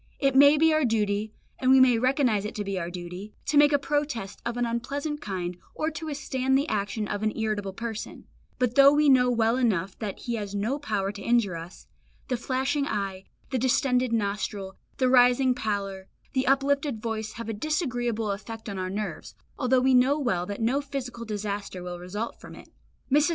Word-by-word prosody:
It 275 -2 +2
may 285 +2 +7
be 320 +1 +4
our 310 0 +2
duty, 215 -3 0 0.3
and 255 - +1
we 265 0 +7
may 250 -3 +5
recognise 255 -5 +2
it 210 - -5
to 210 - -2
be 195 -2 -3
our 170 -1 -4
duty, 180 +3 -8
to 290 - -1
make 290 0 +6
a 285 - +5
protest 285 -9 -2
of 235 0 -3
an 245 - +1
unpleasant 280 +6 -3
kind, 180 -3 -4 0.2
or 310 +1 -1
to 320 0 -6
withstand 265 -3 0
the 280 +3 0
action 210 -1 -2
of 205 - -3
an 215 0 -1
irritable 215 -3 -1
person; 225 +2 -6 0.3
but 250 -2 +1
though 275 +1 +8
we 295 0 +4
know 250 -2 +5
well 230 0 +2
enough 195 -7 0
that 210 -3 -5
he 240 - -3
has 205 -1 -5
no 225 +8 -1
power 205 -8 -1
to 205 - -10
injure 230 -4 +2
us, 165 +2 -9 0.4
the 255 - +1
flashing 270 +4 -1
eye, 195 -4 -3 0.3
the 260 - 0
distended 250 0 +2
nostril, 200 -2 -2 0.2
the 260 - +2
rising 250 +1 +5
pallor, 200 -5 -3 0.3
the 260 -1 0
uplifted 275 -2 +1
voice 220 -1 -4
have 230 0 -7
a 225 - -2
disagreeable 240 - -1
effect 220 +3 -7
on 200 -2 -4
our 185 0 -2
nerves, 210 +2 -5 0.2
although 255 -1 +3
we 260 +1 +3
know 255 +3 +4
well 185 -11 -1
that 205 +2 -5
no 260 +5 +2
physical 260 -4 -6
disaster 205 -3 -4
will 175 0 -6
result 205 +6 -5
from - - -11
it. - - -14 0.4
Mrs. 295 +4 +4
235 Hz, 200 wpm, -27 LUFS, 205-265 Hz, 0.4 s, though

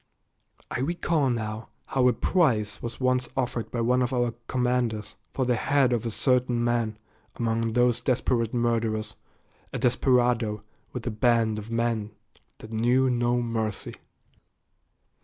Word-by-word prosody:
I - - -2
recall 160 -1 0
now 110 -2 -3 0.2
how 130 -2 +2
a 125 - +4
prize 110 - +1
was 120 0 -6
once 130 -1 +1
offered 120 -3 -2
by 120 - -2
one 125 +2 +2
of 125 +1 0
our 120 -2 0
commanders 125 -4 -1 0.2
for 130 - -1
the 125 - +2
head 135 +1 +2
of 115 -1 -1
a - - -1
certain 125 0 +1
man 120 -2 0 0.4
among 115 -1 -1
those 120 -1 +3
desperate 120 -3 +1
murderers, 115 -3 0 0.6
a - - -3
desperado 120 -4 +2 0.3
with 125 -3 -6
a 120 - -1
band 115 -1 +2
of 105 +1 -9
men 115 -2 -1 0.5
that 110 - -12
knew 125 +4 +2
no 120 0 +1
mercy. 110 -3 -2
120 Hz, 140 wpm, -26 LUFS, 115-125 Hz, 0.6 s, a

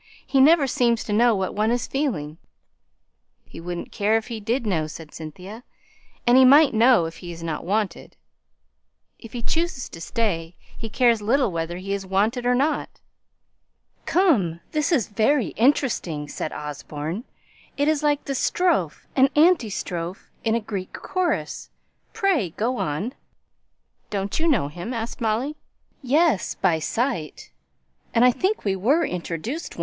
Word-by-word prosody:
He 270 - +3
never 305 +1 +6
seems 235 -3 +1
to 210 - -3
know 235 +1 +4
what 190 -1 -2
one 215 +1 +1
is 240 0 0
feeling." 175 - -2 1.1
"He - - -11
wouldn't 175 0 -6
care 210 +2 +2
if 225 +2 -5
he 230 -2 -4
did 230 +4 -1
know," 165 -7 0
said 155 0 -10
Cynthia. 185 +9 -9 0.6
"And 245 +1 +6
he - - +8
might 280 +2 +7
know 230 -4 +5
he 165 +2 -7
is 165 0 -9
not 160 -2 -3
wanted." 210 0 -2 1.0
"If 230 - -12
he 240 -1 -5
chooses 330 -3 -1
to 165 - -10
stay, 175 -7 -2 0.2
he 225 - -6
cares 235 -1 +3
little 240 +2 +2
whether 165 +1 -3
he 195 +2 -4
is 200 -1 -3
wanted 215 +6 0
or 250 - +4
not." 285 +5 -1 1.1
"Come, 230 - +2
this 300 0 0
is 265 - +2
very 230 +5 +2
interesting," 225 - +1
said 155 - -4
Osborne. 150 - -5 0.5
"It 285 +1 +1
is 310 -1 +2
like 295 -1 +1
the 275 - -2
strophe 275 - 0
and 270 0 +5
anti 310 -6 +4
strophe 180 -1 -5
in 225 0 +1
a - - +2
Greek 200 -4 -6
chorus. 370 -2 -2 0.4
Pray, 385 - +1
go 245 +4 0
on." 170 - -2 1.0
"Don't 200 +3 -2
you 330 - +1
know 240 - +2
him?" 175 - -6
asked 230 +2 -5
Molly. 235 +7 -1 0.4
"Yes, 285 - +2
by 170 -4 +1
sight, 175 - -3 0.6
and 235 +2 +6
I 250 - +7
think 380 - -1
we 195 -1 +1
were 255 - +2
once - - -1
introduced. 180 - -5
225 Hz, 155 wpm, -23 LUFS, 180-270 Hz, 1.1 s, he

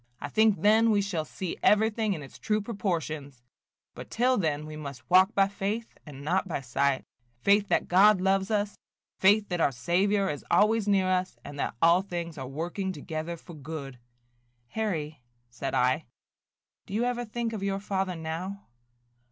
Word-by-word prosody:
I 145 - -5
think 215 +3 +3
then 220 +2 +5
we 210 -2 +3
shall 190 -6 -2
see 180 +2 -5
everything 220 0 +3
in 155 -5 -6
its 135 - -13
true 215 -1 0
proportions; 160 - -4 0.5
but - - -10
till 250 +2 +2
then 155 -7 -1
we 155 0 -8
must 140 -3 -8
walk 185 +3 +6
by 195 -1 +4
faith 205 +3 -4
and 140 -1 -9
not 185 +6 0
by 170 - -2
sight, 135 +1 0 0.2
– 120 0 -41
faith 205 +1 +4
that - - +1
God 195 +2 +6
loves 190 +1 +1
us, 205 -1 0 0.5
faith 205 +2 +4
that 175 -2 -1
our 140 - +3
Saviour 190 +10 +1
is 145 - -6
always 215 +4 +3
near 195 -2 +3
us, 185 0 0
and 145 0 -8
that - - -2
all 170 +2 +6
things 170 -4 -5
are 130 - -5
working 175 +7 -3
together 160 +1 -5
for 170 - -13
good." 140 -3 -7 0.7
"Harry," 160 - -3 0.3
said 130 +3 -4
I, 130 +5 +1 0.8
"do 195 - -5
you 230 - +1
ever 245 0 -1
think 230 0 -3
of 215 - -4
your 195 0 -1
father 190 -2 -2
now?" 170 +5 -5
185 Hz, 175 wpm, -28 LUFS, 155-205 Hz, 0.8 s, walk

